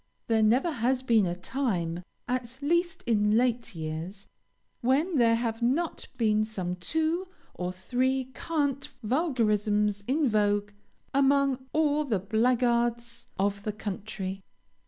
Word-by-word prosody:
There 225 -1 +2
never 245 +10 +3
has 255 -1 0
been 225 -6 +3
a 175 - -2
time, 180 -6 -2 0.3
at 250 0 -3
least 340 +3 +1
in 210 -2 +3
late 235 -3 0
years, 165 +5 -5 0.6
when 290 +7 +2
there 230 -2 +5
have 230 0 -2
not 285 +8 0
been 215 -2 +3
some 185 -5 -3
two 320 - 0 0.3
or 180 0 -3
three 255 +7 -1
cant 285 -4 -1
vulgarisms 210 - +1
in 285 +3 +2
vogue 205 -2 +1 0.4
among 275 -1 +2
all 305 -1 +2
the 240 -8 0
blackguards 235 +2 +1
of 200 +1 0
the 215 - -2
country. 195 -2 -5
235 Hz, 125 wpm, -28 LUFS, 205-265 Hz, 0.6 s, there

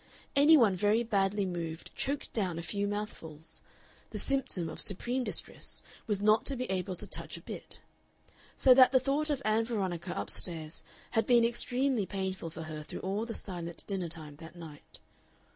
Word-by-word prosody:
Any 295 +3 +7
one 220 -8 +4
very 210 +5 +2
badly 200 -2 +1
moved 165 -3 -5
choked 280 +1 -2
down 185 -7 -1
a 170 - -4
few 200 +3 -1
mouthfuls; 165 -7 -6 0.5
the - - -5
symptom 265 -11 +1
of 160 - -4
supreme 245 +6 +2
distress - - -4 0.2
was 210 -3 +1
not 215 +2 +4
to 275 - +2
be 255 0 -2
able 185 0 -2
to - - -5
touch - - -4
a - - -11
bit. - - -2 0.8
So 260 - +8
that 255 0 +7
the 260 - +5
thought 285 +4 0
of 280 -2 -1
Ann 215 +1 +3
Veronica 190 -6 -3
up - - +1
stairs 160 -3 0 0.3
had 225 -1 +1
been 240 -2 +6
extremely 245 -1 +1
painful 190 -3 -3
for 160 0 -7
her 155 -1 -6
through 150 - -7
all 200 +4 -2
the 230 - -3
silent 175 -3 -5
dinner 190 -4 -2
time 155 -3 -8
that 165 +1 -11
night. 160 -4 -11
200 Hz, 180 wpm, -31 LUFS, 170-240 Hz, 0.8 s, So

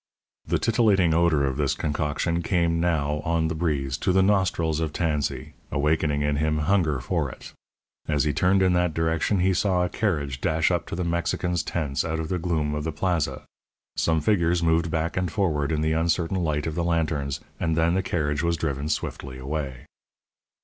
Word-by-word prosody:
The - - +1
titillating 100 -7 +3
odour 80 -3 +3
of 65 -1 -1
this 70 -3 +1
concoction 75 +3 -1
came 85 -1 +1
now, 75 -4 0
on 80 0 +1
the - - -1
breeze, 75 -6 -1
to - - +1
the 95 +1 +4
nostrils 90 -5 +1
of 80 -2 -1
Tansey, 75 -4 -2 0.2
awakening 75 0 +1
in 75 0 0
him 75 +1 +1
hunger 80 -3 +1
for - - -1
it. - - -11 0.5
As 75 -2 +1
he 75 -1 0
turned 95 +5 +3
in 90 -1 +3
that 90 -3 +1
direction 80 +4 +1
he 95 +1 +3
saw 90 -1 +2
a - - -3
carriage 75 -12 -2
dash 80 0 +2
up 85 -3 -1
to - - -4
the 90 - -2
Mexicans' 85 0 -1
tents 75 -5 -2
out 80 -1 -2
of 80 -1 -4
the 90 - -1
gloom 80 -3 -1
of 75 0 -3
the 80 - -2
Plaza. 85 0 -1 0.5
Some 80 -1 +1
figures 85 -1 +2
moved 80 0 +2
back 80 +1 -1
and 90 -2 -1
forward 80 -6 0
in 75 -1 0
the 80 0 +1
uncertain 85 +2 0
light 75 -4 -1
of 80 - -2
the 85 +1 -1
lanterns, 80 -5 -1 0.2
and 80 -1 0
then 80 +1 +3
the 95 - +2
carriage 75 -5 -1
was 85 0 0
driven 75 -2 -2
swiftly 65 -4 -4
away. 70 -1 -5
80 Hz, 190 wpm, -25 LUFS, 75-85 Hz, 0.5 s, the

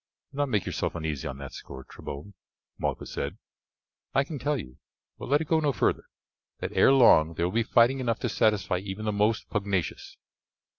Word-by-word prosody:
"Do - - -13
not 145 -1 +1
make 105 -6 0
yourself - - -2
uneasy 80 -4 -3
on 65 - -5
that 70 -1 -8
score, 65 -1 -9
Trebon," 75 +11 -9 0.5
Malchus - - -3
said, - - -3 0.8
"I 135 - +5
can 150 0 -6
tell 145 +3 0
you, 65 - -10 0.4
but - - -7
let 145 +2 +4
it 160 - -4
go 160 +1 +3
no 150 -2 +2
further, - - 0 0.5
that - - -4
ere - - +6
long 85 -12 +6
there 85 - 0
will 90 - -2
be 115 - +3
fighting 120 +3 +4
enough 115 -3 0
to 120 - 0
satisfy 105 -4 +1
even 100 +3 -6
the 105 - +1
most 105 0 +1
pugnacious." 100 -4 -2
105 Hz, 195 wpm, -27 LUFS, 85-130 Hz, 0.8 s, ere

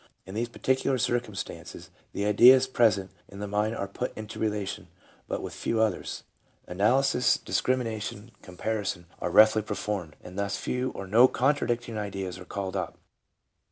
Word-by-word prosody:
In 95 - -9
these 115 +3 -2
particular 130 +2 0
circum 120 -3 -1
stances - - -7 0.2
the 100 - -2
ideas 125 +5 +7
present 105 -7 +2 0.2
in 100 - -11
the 105 +1 -4
mind 105 +2 0
are 100 - -3
put 125 +6 -4
into 110 0 -7
relation, 105 -2 -2 0.4
but - - -3
with - - -6
few 115 - -1
others; 110 -4 -1 0.4
analysis, 125 +6 +2
discrimination, 115 -3 -2
comparison, 95 -1 -3
are - - -2
roughly 110 +4 +6
performed, 100 -6 -4
and 90 +2 -8
thus 100 0 -1
few 125 +1 -2
or 100 - -5
no 115 +6 +6
contradicting 120 -4 0
ideas 95 -3 -4
are 90 - -10
called 100 0 -4
up. 90 -3 -3
105 Hz, 155 wpm, -27 LUFS, 100-120 Hz, 0.4 s, ideas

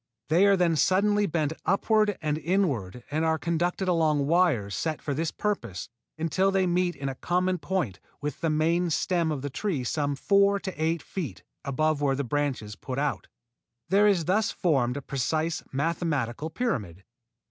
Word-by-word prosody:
They 175 +6 +5
are 200 -1 +5
then 175 -2 +2
suddenly 205 +5 +3
bent 155 -3 0
upward 210 +1 +2
and 150 0 0
inward 140 - -1
and 155 +2 0
are 160 0 +2
conducted 175 +3 -1
along 155 -5 +2
wires 150 - +2
set 160 -2 -2
for 145 - -3
this 160 +3 -1
purpose 195 - -3 0.3
until 165 +4 +1
they 195 -1 +2
meet 180 0 +1
in 135 - -5
a 135 - -2
common 180 +5 0
point 170 - -2 0.2
with 145 -2 -5
the 165 - +1
main 165 +3 +2
stem 170 0 +1
of 140 -3 -3
the 145 - -3
tree 160 -4 -2
some 145 +3 -1
four 200 +6 +3
to 190 - -4
eight 160 +1 -1
feet 145 - -5 0.2
above 155 +2 0
where 140 -2 +2
the 140 - -1
branches 130 -5 -2
put 130 +2 -6
out. 145 -1 -1 0.6
There 205 +2 +5
is 185 -6 +2
thus 205 +5 +2
formed 135 -8 +1
a 145 - -6
precise 155 +5 -1
mathematical 150 -2 -1
pyramid. 105 - -3
160 Hz, 170 wpm, -27 LUFS, 140-185 Hz, 0.6 s, They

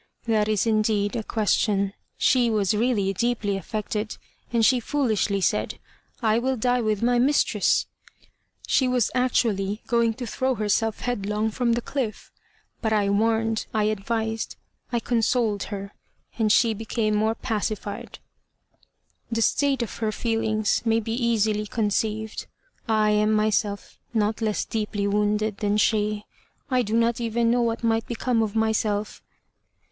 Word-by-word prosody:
"That 215 -2 +2
is, 215 -1 +1
indeed, 215 -1 +1
a 230 - -1
question. 205 -2 +1 0.2
She 245 -2 +3
was 210 -2 +1
really 210 -3 +1
deeply 220 -1 0
affected, 210 +1 -4 0.3
and 230 -2 +3
she 255 0 +4
foolishly 220 -7 0
said, - - 0 0.5
'I 220 0 +3
will 260 +2 0
die 245 +2 +1
with 215 -1 0
my 245 0 +3
mistress.' 280 +4 +2 0.8
She 260 - +2
was 250 -3 +1
actually 220 -5 0
going 235 -3 +2
to 250 - -5
throw 260 +3 -1
herself 215 +1 0
headlong 215 -2 -1
from 235 +1 +1
the 235 0 -1
cliff; 240 -7 -4 0.5
but 220 - 0
I 205 -2 +2
warned, 225 +1 +1
I 215 - +2
advised, 220 +2 -2 0.4
I 240 - +1
consoled 230 -3 +1
her, 200 -1 -6 0.5
and 215 -2 +3
she 230 +1 +4
became 220 0 -1
more 220 +2 +1
pacified." 210 -2 -4 1.1
"The 230 0 +1
state 275 -1 +2
of 230 - -7
her 220 -2 -1
feelings 220 -1 0
may 225 -1 +2
be 225 0 -4
easily 220 -3 +1
conceived. 220 0 -2 0.4
I 215 -1 +3
am 210 0 +3
myself 210 -1 0 0.2
not 215 +1 +1
less 215 -2 0
deeply 210 -2 -2
wounded 210 +1 0
than 205 0 +1
she. 210 -1 +1 0.5
I 255 -1 +3
do 220 -1 -2
not 230 +1 +2
even 230 0 +1
know 245 0 +2
what 230 0 -1
might 225 -1 +1
become 235 0 0
of 220 -1 -2
myself." 215 -1 0
220 Hz, 145 wpm, -25 LUFS, 210-235 Hz, 1.1 s, she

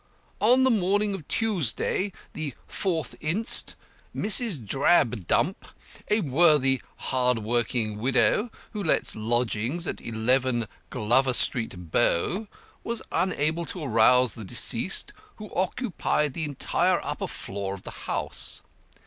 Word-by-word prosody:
On 250 +5 +5
the 260 - +4
morning 205 0 +1
of 175 -7 -7
Tuesday, 200 - 0 0.2
the 150 -5 -5
4th 170 -5 -2
inst., 185 +9 +4 0.4
Mrs. 215 -3 +3
Drabdump, 125 - +2 0.5
a 210 +1 +2
worthy 140 -3 +3
hard 125 -2 +1
working 110 -1 -1
widow, 135 - +2 0.2
who 210 - -5
lets 170 - +2
lodgings 120 +7 -1
at - - -4
11 120 +1 0 0.2
Glover 125 +4 +2
Street, 95 -9 -2
Bow, 190 - +1 0.4
was 235 -1 -4
unable 170 -2 0
to 165 0 -6
arouse 125 -1 +4
the 110 - -8
deceased, 95 - +1 0.2
who 210 -1 -11
occupied 180 - -1
the 160 +1 -3
entire 145 -3 0
upper - - -3
floor 100 0 -6
of 95 - -14
the - - -7 0.2
house. - - -4
140 Hz, 120 wpm, -26 LUFS, 120-185 Hz, 0.5 s, On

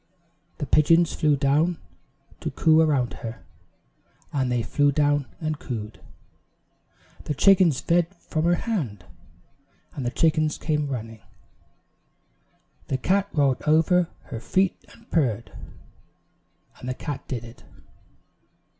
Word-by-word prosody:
"The - - -3
pigeons 165 +2 +4
flew 150 -2 +2
down 150 +5 +2 0.6
to - - -3
coo 160 -1 +3
around 140 -6 +1
her 115 -1 -7 0.4
" - - -37
And 130 -3 0
they 120 -1 0
flew 145 +3 +2
down 145 -1 +1
and 155 -3 -3
cooed. 110 -4 -6 1.2
"The 150 - -2
chickens 180 -2 +4
fed 170 0 +2
from 160 -2 -3
her 175 +1 +4
hand 140 - -3 0.4
" - - -38
And 135 - -5
the 120 - 0
chickens 155 +2 +1
came 150 -2 -1
running. 115 -5 -6 1.7
"The 135 - -1
cat 195 +8 +1
rolled 140 -4 +1
over 165 +3 +3 0.2
her 115 - -3
feet 185 +11 +1 0.2
and - - -19
purred 120 -9 0 0.6
" - - -33
And 125 - -6
the 130 - -2
cat 145 +1 -6
did 120 -3 -4
it. 115 +2 -14
145 Hz, 130 wpm, -24 LUFS, 125-165 Hz, 1.7 s, pigeons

